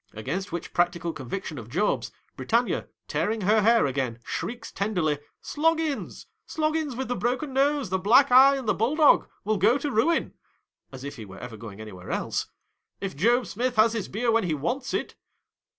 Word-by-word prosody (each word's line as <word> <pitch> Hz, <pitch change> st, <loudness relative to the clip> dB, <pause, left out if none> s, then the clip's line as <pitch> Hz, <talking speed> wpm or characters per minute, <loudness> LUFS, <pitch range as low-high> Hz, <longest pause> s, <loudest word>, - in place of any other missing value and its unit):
Against 165 Hz, -, -4 dB
which 170 Hz, 0 st, -5 dB
practical 175 Hz, -1 st, 0 dB
conviction 155 Hz, +2 st, -5 dB
of 115 Hz, -1 st, -10 dB
Job's, 210 Hz, +12 st, 0 dB, 0.2 s
Britannia, -, -, 0 dB, 0.2 s
tearing 220 Hz, +1 st, -1 dB
her 210 Hz, +3 st, +3 dB
hair 230 Hz, +2 st, +4 dB
again, 130 Hz, -4 st, -2 dB
shrieks 235 Hz, -1 st, -5 dB
ten 205 Hz, +2 st, -2 dB
derly, 155 Hz, -5 st, +1 dB, 0.2 s
" -, -, -57 dB
Sloggins! 320 Hz, -1 st, -1 dB, 0.2 s
Sloggins 310 Hz, -3 st, -1 dB
with 265 Hz, +2 st, -3 dB
the 245 Hz, -, -1 dB
broken 255 Hz, +4 st, -2 dB
nose, 275 Hz, -5 st, +1 dB
the 190 Hz, -, +1 dB
black 250 Hz, +8 st, +5 dB
eye, 270 Hz, +2 st, +8 dB
and 265 Hz, -4 st, -5 dB
the -, -, +3 dB
bulldog, 290 Hz, +7 st, +3 dB
will 215 Hz, +1 st, 0 dB
go 215 Hz, +7 st, +4 dB
to 290 Hz, 0 st, -3 dB
ruin," 265 Hz, +9 st, +1 dB, 0.3 s
— -, -, -53 dB
as 130 Hz, -1 st, -9 dB
if 140 Hz, -1 st, -7 dB
he 110 Hz, -, -7 dB
were 95 Hz, -1 st, -12 dB
ever 120 Hz, 0 st, -8 dB
going 110 Hz, -2 st, -10 dB
anywhere 95 Hz, -4 st, -10 dB
else! -, -, -2 dB, 0.2 s
— -, -, -50 dB
" -, -, -57 dB
if 195 Hz, -2 st, -4 dB
Job 235 Hz, -, +3 dB
Smith 240 Hz, +7 st, -2 dB
has 220 Hz, +1 st, +4 dB
his 225 Hz, -4 st, -3 dB
beer 230 Hz, +4 st, 0 dB
when 225 Hz, -3 st, +2 dB
he 160 Hz, -3 st, 0 dB
wants 210 Hz, -, -3 dB
it." -, -, -3 dB
215 Hz, 200 wpm, -26 LUFS, 160-255 Hz, 0.3 s, eye